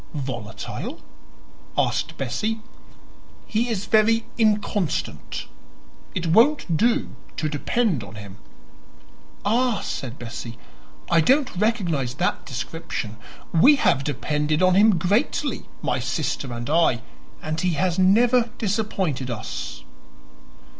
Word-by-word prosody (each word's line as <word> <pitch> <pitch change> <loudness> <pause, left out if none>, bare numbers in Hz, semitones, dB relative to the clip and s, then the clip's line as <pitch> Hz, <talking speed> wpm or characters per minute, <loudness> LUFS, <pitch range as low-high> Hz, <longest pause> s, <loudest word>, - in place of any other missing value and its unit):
"Volatile?" 125 -6 -5 0.8
asked - - 0
Bessie. 215 - -2 0.9
"He 235 +2 0
is 205 -4 -2
very 225 +1 +3
inconstant. 210 -5 0 0.7
It 180 - -1
won't 220 - +4
do 230 +7 +1 0.2
to 155 - 0
depend 155 - 0
on 100 - -10
him." 100 -2 -10 1.1
"Ah," 235 0 +2
said 130 -1 -5
Bessie, 120 0 -7 0.5
"I 165 -1 +6
don't 265 - +3
recognize 175 - 0
that - - -1
description. 120 -4 -5 0.4
We 260 - +7
have 180 - +2
depended 150 +3 0
on 185 0 +5
him 205 0 +5
greatly 215 - 0 0.2
my - - 0
sister 135 - -2
and 120 0 -5
I 150 -7 +3 0.4
and 155 0 -2
he 180 -2 +1
has 180 +2 0
never 235 +5 +4
disappointed 190 - -1
us." - - -5
175 Hz, 110 wpm, -24 LUFS, 135-220 Hz, 1.1 s, We